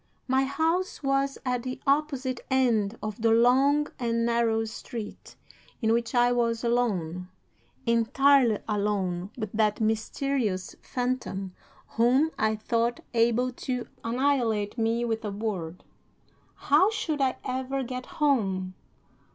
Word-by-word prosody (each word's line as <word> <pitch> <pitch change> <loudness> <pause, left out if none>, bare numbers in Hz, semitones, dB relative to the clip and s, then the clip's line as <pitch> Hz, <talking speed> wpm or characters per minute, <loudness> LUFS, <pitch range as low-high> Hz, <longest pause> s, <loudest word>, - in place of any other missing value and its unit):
"'My 265 +1 +2
house 325 +6 -1
was 275 0 +1
at 250 -1 0
the 255 +1 -5
opposite 275 -3 0
end 235 -5 +2
of 215 +1 -5
the 230 - +3
long 260 +6 +4
and 230 -1 0
narrow 230 -1 +1
street, 220 0 -8 0.4
in 225 -2 +2
which 235 +1 -1
I 245 0 +4
was 235 -1 0
alone, 185 -8 -1 0.6
entirely 235 +1 +4
alone 200 -4 -1
with 215 -4 -4
that 215 -1 +1
mysterious 220 -2 -1
phantom 245 -7 -3 0.3
whom 255 +7 +2
I 220 0 +1
thought 230 +2 -1
able 235 +2 +2
to 250 0 -4 0.2
annihilate 230 -4 0
me 230 0 0
with 225 -1 -2
a 210 - -2
word. 195 -5 -4 0.7
How 305 +8 +4
should 320 -9 -2
I 260 -1 +1
ever 260 +1 -2
get 255 0 -6
home? 195 -11 0
235 Hz, 125 wpm, -27 LUFS, 220-265 Hz, 0.7 s, long